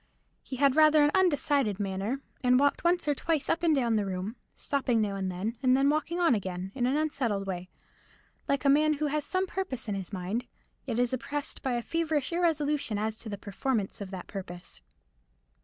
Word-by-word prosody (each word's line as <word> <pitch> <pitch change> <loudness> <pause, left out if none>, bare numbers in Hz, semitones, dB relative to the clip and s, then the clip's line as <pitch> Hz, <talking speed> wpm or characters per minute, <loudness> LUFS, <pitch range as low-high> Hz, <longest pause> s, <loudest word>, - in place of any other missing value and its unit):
He 265 - -7
had 275 0 +3
rather 310 -1 +6
an 290 - +4
undecided 285 - +2
manner, 200 +7 -2 0.2
and 250 0 +5
walked 285 0 +2
once 345 -1 +2
or 295 - +4
twice 310 +1 -1
up 330 - 0
and 330 -3 +3
down 235 -5 +2
the 205 - 0
room, 190 +4 -4 0.2
stopping 260 -5 0
now 210 -2 0
and 190 -1 -2
then, 205 +6 -3
and 255 -1 +4
then 275 +1 +4
walking 310 +3 -1
on 335 -6 +4
again, 185 -3 -3
in 245 -2 0
an 270 +3 +1
unsettled 255 -10 -1
way; 185 -1 -5 0.8
like 280 0 0
a - - +5
man 305 +2 +5
who 305 +1 -2
has 300 0 0
some 370 0 0
purpose 370 - -4
in 210 - -1
his 195 -1 -5
mind, 195 +5 -3 0.4
yet 235 -3 -1
is 245 0 +1
oppressed 285 +3 -3
by 260 - -1
a 240 -1 -1
feverish 320 +1 -1
irresolution 300 -9 +1
as 215 +1 -1
to 220 - -7
the 205 - -4
performance 205 +1 -2
of 200 - -5
that 185 -2 -7
purpose. 180 -3 -8
255 Hz, 205 wpm, -29 LUFS, 205-300 Hz, 0.8 s, rather